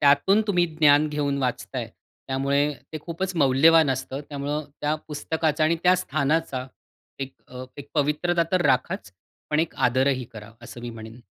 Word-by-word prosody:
त्यातून 145 Hz, +9 st, +4 dB
तुम्ही 180 Hz, -4 st, +2 dB
ज्ञान 150 Hz, -1 st, +5 dB
घेऊन 145 Hz, -2 st, -1 dB
वाचताय. 125 Hz, -3 st, -3 dB, 0.4 s
त्यामुळे 140 Hz, +2 st, +1 dB, 0.2 s
ते 155 Hz, -, -4 dB
खूपच 180 Hz, +4 st, -4 dB
मौल्यवान 150 Hz, +2 st, +5 dB
असतं. 130 Hz, +1 st, -3 dB
त्यामुळं 145 Hz, +1 st, -3 dB, 0.2 s
त्या 150 Hz, +1 st, +1 dB
पुस्तकाचा 155 Hz, 0 st, 0 dB
आणि 165 Hz, +2 st, +2 dB
त्या 180 Hz, 0 st, +6 dB
स्थानाचा 145 Hz, -4 st, -1 dB, 0.5 s
एक 135 Hz, -1 st, -5 dB, 0.2 s
अ, 125 Hz, 0 st, -8 dB
एक 145 Hz, 0 st, -9 dB
पवित्रता 155 Hz, +4 st, +1 dB
तर 185 Hz, -1 st, +3 dB
राखाच, 125 Hz, -7 st, 0 dB, 0.4 s
पण 150 Hz, +1 st, +3 dB
एक 165 Hz, -, -2 dB
आदरही 130 Hz, +1 st, +2 dB
करा, 110 Hz, 0 st, -10 dB
असं 120 Hz, -, -10 dB
मी 120 Hz, 0 st, -6 dB
म्हणेन. 115 Hz, +1 st, -10 dB
145 Hz, 155 wpm, -25 LUFS, 130-160 Hz, 0.5 s, त्या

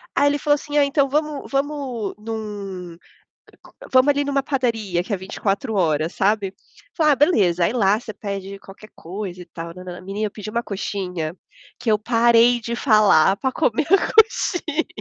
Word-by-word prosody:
Aí 285 Hz, -, +4 dB
ele 290 Hz, 0 st, -1 dB
falou 290 Hz, -1 st, +3 dB
assim: 295 Hz, 0 st, -4 dB
"Ah 285 Hz, -, +5 dB
então 280 Hz, -1 st, +1 dB
vamos 300 Hz, 0 st, -2 dB
vamos 275 Hz, -6 st, -2 dB
num 200 Hz, -6 st, -6 dB, 1.0 s
vamos 260 Hz, +2 st, +5 dB
ali 285 Hz, 0 st, +1 dB
numa 280 Hz, -1 st, 0 dB
padaria 225 Hz, -10 st, -1 dB
que 210 Hz, -, -6 dB
é -, -, -1 dB
24 200 Hz, +5 st, -3 dB
horas", 160 Hz, -3 st, 0 dB
sabe? 200 Hz, -1 st, 0 dB, 0.4 s
Falei: 305 Hz, -3 st, +4 dB
"Ah -, -, +2 dB
beleza, 195 Hz, -, +3 dB
aí -, -, +1 dB
lá 210 Hz, -3 st, +2 dB
você 215 Hz, -3 st, -8 dB
pede 200 Hz, -1 st, -6 dB
qualquer 205 Hz, +2 st, -14 dB
coisa 180 Hz, +1 st, -7 dB
e -, -, -14 dB
tal", 165 Hz, 0 st, -8 dB, 0.3 s
menina 205 Hz, +2 st, -3 dB
pediu 215 Hz, 0 st, -8 dB
uma 235 Hz, 0 st, -1 dB
coxinha, 180 Hz, -4 st, -4 dB, 0.4 s
que 230 Hz, -, 0 dB
eu 210 Hz, -, +3 dB
parei 235 Hz, +1 st, +4 dB
de 235 Hz, +1 st, -4 dB
falar 210 Hz, -, +4 dB
para 260 Hz, -1 st, -1 dB
comer 235 Hz, +6 st, 0 dB
a 390 Hz, -, +3 dB
coxinha. 350 Hz, -8 st, +2 dB
220 Hz, 170 wpm, -21 LUFS, 195-275 Hz, 1.0 s, Ah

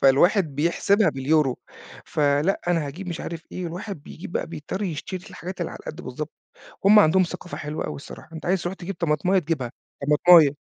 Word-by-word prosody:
فالواحد 155 Hz, +4 st, +4 dB
بيحسبها 180 Hz, +7 st, +3 dB
باليورو، 135 Hz, 0 st, +1 dB, 0.5 s
فلأ 145 Hz, +5 st, +1 dB
أنا 165 Hz, -4 st, +1 dB
هاجيب 180 Hz, +7 st, -7 dB
مش 170 Hz, -1 st, -4 dB
عارف 165 Hz, -1 st, -5 dB
إيه، 185 Hz, -, -4 dB
الواحد 175 Hz, -1 st, -6 dB
بيجيب 170 Hz, +4 st, -9 dB
بقى -, -, -1 dB
بيضطر 165 Hz, +4 st, -5 dB
يشتري 185 Hz, +1 st, -4 dB
الحاجات 185 Hz, 0 st, -7 dB
اللي 170 Hz, -, -2 dB
على -, -, -8 dB
القد 155 Hz, -, -7 dB
بالضبط. 150 Hz, +5 st, -6 dB, 0.5 s
هم 210 Hz, +2 st, +8 dB
عندهم 190 Hz, -1 st, +6 dB
ثقافة 175 Hz, 0 st, -5 dB
حلوة 150 Hz, +1 st, -4 dB
أوي -, -, -4 dB
الصراحة، 145 Hz, +2 st, -11 dB
أنت 160 Hz, +1 st, -7 dB
عايز 185 Hz, 0 st, +1 dB
تروح 175 Hz, +2 st, -3 dB
تجيب 195 Hz, +1 st, -6 dB
طماطماية 170 Hz, +4 st, +2 dB
تجيبها، 150 Hz, -8 st, -2 dB, 0.3 s
طماطماية. 150 Hz, -1 st, +6 dB
165 Hz, 180 wpm, -24 LUFS, 150-185 Hz, 0.5 s, هم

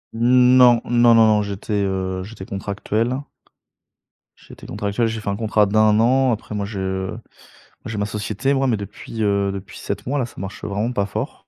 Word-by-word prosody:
N 125 Hz, +2 st, +5 dB
non, 120 Hz, -2 st, +6 dB
non, 120 Hz, 0 st, +4 dB
non, 115 Hz, -1 st, +6 dB
non, 105 Hz, -1 st, +3 dB
j'étais 100 Hz, +1 st, -5 dB
heu, 95 Hz, -1 st, -2 dB
j'étais 100 Hz, -2 st, -10 dB
contractuel. 105 Hz, +5 st, -2 dB, 1.2 s
J'étais -, -, -15 dB
contractuel. 105 Hz, +4 st, -1 dB
J'ai 110 Hz, 0 st, -3 dB
fait 105 Hz, -, -4 dB
un 100 Hz, -, -1 dB
contrat 105 Hz, -1 st, +2 dB
d'1 110 Hz, +1 st, +3 dB
an, 130 Hz, +2 st, +3 dB
après 110 Hz, -1 st, -4 dB
moi, 100 Hz, -1 st, -2 dB
je 95 Hz, -2 st, -3 dB
bah, -, -, -7 dB, 0.7 s
j'ai 110 Hz, -, -5 dB
ma 105 Hz, -, 0 dB
société 110 Hz, +6 st, -2 dB
moi, 135 Hz, 0 st, +1 dB
mais 115 Hz, -, +1 dB
depuis, 105 Hz, +2 st, -7 dB
heu, 100 Hz, -1 st, +1 dB
depuis 100 Hz, +3 st, -8 dB
7 -, -, -5 dB
mois, 145 Hz, +2 st, 0 dB
là, 125 Hz, -, 0 dB
ça 120 Hz, -, -14 dB
marche 95 Hz, +1 st, -7 dB
vraiment 105 Hz, +4 st, -2 dB
pas 100 Hz, -4 st, 0 dB
fort. 95 Hz, -, -6 dB
105 Hz, 195 wpm, -21 LUFS, 100-115 Hz, 1.2 s, non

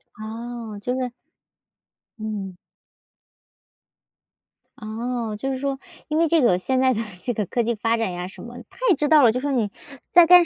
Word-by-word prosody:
哦， 225 Hz, 0 st, -6 dB
就 245 Hz, +5 st, -2 dB
是 255 Hz, -2 st, -2 dB, 1.1 s
嗯。 205 Hz, -4 st, -4 dB, 2.2 s
哦， 225 Hz, 0 st, -3 dB
就 270 Hz, +6 st, -2 dB
是 265 Hz, -, -2 dB
说， 275 Hz, 0 st, -2 dB, 0.3 s
因 310 Hz, +1 st, 0 dB
为 335 Hz, -, +4 dB
这 330 Hz, +1 st, +4 dB
个 210 Hz, -8 st, +4 dB
现 260 Hz, +7 st, 0 dB
在 260 Hz, 0 st, +4 dB
的 225 Hz, -, -1 dB, 0.2 s
这 245 Hz, -, 0 dB
个 210 Hz, -2 st, -1 dB
科 240 Hz, -, 0 dB
技 235 Hz, +1 st, +1 dB
发 225 Hz, +2 st, +1 dB
展 225 Hz, -5 st, -1 dB
呀 180 Hz, 0 st, -4 dB
什 190 Hz, -, -11 dB
么， 240 Hz, +1 st, -9 dB
它 -, -, -21 dB
也 365 Hz, -, +6 dB
知 295 Hz, +1 st, 0 dB
道 305 Hz, -3 st, +7 dB
了， 230 Hz, -, +7 dB
就 250 Hz, -, -1 dB
说 285 Hz, +2 st, -1 dB
你 225 Hz, -6 st, +1 dB, 0.4 s
在 350 Hz, -1 st, +8 dB
干 355 Hz, 0 st, +9 dB
240 Hz, 195 characters per minute, -23 LUFS, 215-265 Hz, 2.2 s, 干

